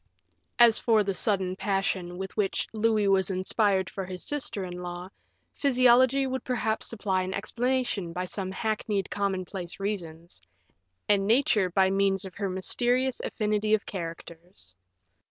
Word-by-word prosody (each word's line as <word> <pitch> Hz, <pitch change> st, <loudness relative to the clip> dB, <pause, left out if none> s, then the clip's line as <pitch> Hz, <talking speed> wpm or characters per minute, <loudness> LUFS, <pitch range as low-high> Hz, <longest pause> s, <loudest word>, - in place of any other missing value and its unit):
As 235 Hz, -2 st, +6 dB
for 220 Hz, -3 st, +3 dB
the 195 Hz, 0 st, -1 dB
sudden 190 Hz, -2 st, 0 dB
passion 190 Hz, -3 st, -1 dB
with 190 Hz, 0 st, -6 dB
which 200 Hz, -3 st, 0 dB
Louis 215 Hz, -1 st, +2 dB
was 195 Hz, -1 st, +3 dB
inspired 190 Hz, 0 st, +1 dB
for 195 Hz, -, -5 dB
his 185 Hz, -1 st, -7 dB
sister 275 Hz, -9 st, -2 dB
in 180 Hz, -1 st, -6 dB
law, 175 Hz, +1 st, -6 dB, 0.4 s
physiology 255 Hz, 0 st, +4 dB
would 260 Hz, 0 st, -3 dB
perhaps 225 Hz, -3 st, -1 dB
supply 195 Hz, -4 st, -1 dB
an 185 Hz, +1 st, -3 dB
explanation 245 Hz, -7 st, -1 dB
by 180 Hz, +2 st, -3 dB
some 190 Hz, 0 st, -4 dB
hackneyed 210 Hz, -1 st, -2 dB
commonplace 190 Hz, -3 st, -3 dB
reasons, 175 Hz, -5 st, -5 dB, 0.7 s
and 200 Hz, -1 st, +3 dB
nature 220 Hz, -5 st, +3 dB
by 190 Hz, +1 st, +2 dB
means 195 Hz, 0 st, +1 dB
of 190 Hz, -, -8 dB
her 200 Hz, 0 st, -3 dB
mysterious 245 Hz, +7 st, +1 dB
affinity 215 Hz, 0 st, +1 dB
of 210 Hz, -, -5 dB
characters. 170 Hz, -, -8 dB
195 Hz, 140 wpm, -27 LUFS, 185-220 Hz, 0.7 s, As